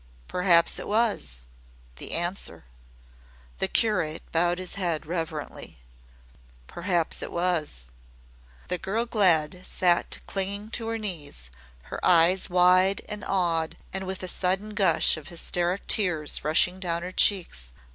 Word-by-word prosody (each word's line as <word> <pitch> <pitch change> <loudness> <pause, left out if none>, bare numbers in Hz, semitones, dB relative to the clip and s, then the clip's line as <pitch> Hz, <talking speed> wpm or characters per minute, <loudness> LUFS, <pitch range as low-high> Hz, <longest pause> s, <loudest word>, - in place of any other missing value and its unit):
Perhaps 175 -2 +3
it - - -7
was 205 - 0 0.6
the - - -3
Answer!" 175 - -2 0.9
The - - +1
curate 185 -9 0
bowed 175 +1 +2
his 185 -1 -4
head 170 -5 -2
reverently. 160 -2 -5 0.9
"Perhaps 175 - -2
it - - -5
was." 170 - -1 0.8
The 180 - -2
girl 215 +5 -2
Glad 180 -6 +2
sat 175 -2 +1
clinging 200 +2 -3
to 230 -2 -3
her 225 0 -2
knees, 150 - -7 0.3
her - - -8
eyes 175 +2 +4
wide 185 +2 +4
and 210 -1 -6
awed 170 -4 0 0.2
and 190 0 -4
with 190 0 -4
a - - -2
sudden 190 +4 0
gush 190 -6 +3
of 155 - -10
hysteric 175 +2 -1
tears 175 -8 +2
rushing 175 +4 +3
down 170 -2 -2
her 180 - -5
cheeks. 165 - +1
180 Hz, 130 wpm, -26 LUFS, 165-195 Hz, 0.9 s, eyes